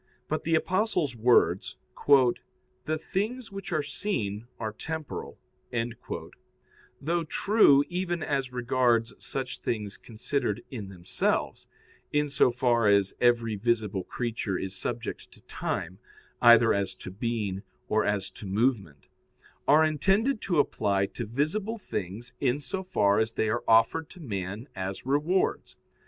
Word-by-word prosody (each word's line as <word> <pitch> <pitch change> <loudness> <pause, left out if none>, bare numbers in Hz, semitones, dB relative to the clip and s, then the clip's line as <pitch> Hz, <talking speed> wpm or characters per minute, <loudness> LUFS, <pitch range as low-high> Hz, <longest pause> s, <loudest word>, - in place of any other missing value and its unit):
But 155 - -2
the 165 0 +3
Apostle's 180 - +1
words, 110 -6 +3 1.1
"The 155 0 0
things 220 +9 -3
which 195 -1 -7
are 155 -3 +1
seen 120 - -3
are 110 -1 -3
temporal," 160 +5 -6 1.6
though 170 +3 0
true 160 -5 +4
even 175 -2 -2
as 135 -3 -1
regards 120 -2 +1
such 130 -2 -4
things 105 -3 -3
considered 115 -1 -3
in 105 -7 -6
themselves 90 -3 -2 0.4
(in 150 0 +1
so 140 - +4
far 120 -2 +2
as 100 -1 +4
every 120 -2 +3
visible 105 -2 0
creature 110 -1 -3
is 95 0 -4
subject - - -5
to - - -18
time, 90 +4 -4 0.4
either 120 -1 +7
as 100 -1 -1
to 95 - -8
being 105 -2 -2 0.3
or 110 0 +2
as 100 -2 -1
to 100 - -9
movement), 100 - 0 0.6
are 150 +2 +6
intended 195 - +2
to 175 -4 0
apply 100 -8 +2
to 115 +3 -6
visible 170 - -1
things 110 - -5
in 130 +1 +1
so 190 +6 -4
far 100 - +2
as 110 0 0
they 110 - 0
are 120 +2 -1
offered 115 +8 +4
to 185 - -14
man 100 - -5
as 95 +3 -5
rewards. 150 +8 0
120 Hz, 135 wpm, -28 LUFS, 105-155 Hz, 1.6 s, either